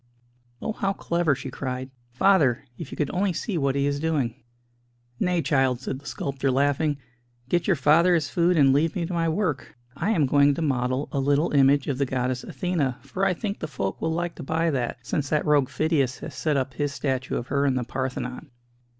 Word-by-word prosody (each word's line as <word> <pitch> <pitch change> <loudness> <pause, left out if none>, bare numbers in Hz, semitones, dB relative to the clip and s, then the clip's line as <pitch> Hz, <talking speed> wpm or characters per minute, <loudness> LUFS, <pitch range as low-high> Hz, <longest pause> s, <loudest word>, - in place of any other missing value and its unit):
"Oh, - - -1
how 195 -2 -1
clever!" 170 -5 0
she 135 0 -7
cried. 130 0 -4 0.2
"Father, 140 -3 +3
if 145 +2 -8
you - - -8
could 150 - -1
only 185 0 +1
see 195 +4 -3
what 140 -4 +1
he 140 0 +1
is 145 0 0
doing!" 140 -6 -1 0.8
"Nay, 180 -2 +1
child," 135 -5 +2
said 130 0 -4
the 145 - -13
sculptor, 135 0 -2
laughing; 145 +3 +1 0.5
"get 175 -1 +1
your 190 - +4
father 160 +5 +4
his 155 -5 0
food, 175 +3 +2
and 135 -3 +5
leave 150 +3 +2
me 170 - -1
to 180 - -5
my 165 -1 +1
work. 160 -6 -2 0.2
I 170 - -1
am 170 -10 +3
going 140 +1 +4
to - - -3
model 130 -1 0
a 140 - -1
little 145 +4 +2
image 140 0 +4
of 140 -2 -2
the 140 - +1
goddess 125 0 -1
Athena, 160 -9 -1
for 190 - -4
I 180 - +2
think 200 +2 -4
the 155 - -4
folk 100 -10 -4
will 160 - 0
like 170 +1 -2
to - - -7
buy 165 +4 0
that, 125 -4 -2
since 140 +4 -2
that 150 - +1
rogue 145 -4 +3
Phidias 145 -5 0
has - - -7
set 145 +2 0
up 130 -1 -2
his 145 0 -1
statue 130 -2 -2
of 120 - -5
her 140 +1 +2
in 135 - +2
the 125 - 0
Parthenon." 130 +3 -4
145 Hz, 215 wpm, -25 LUFS, 130-165 Hz, 0.8 s, and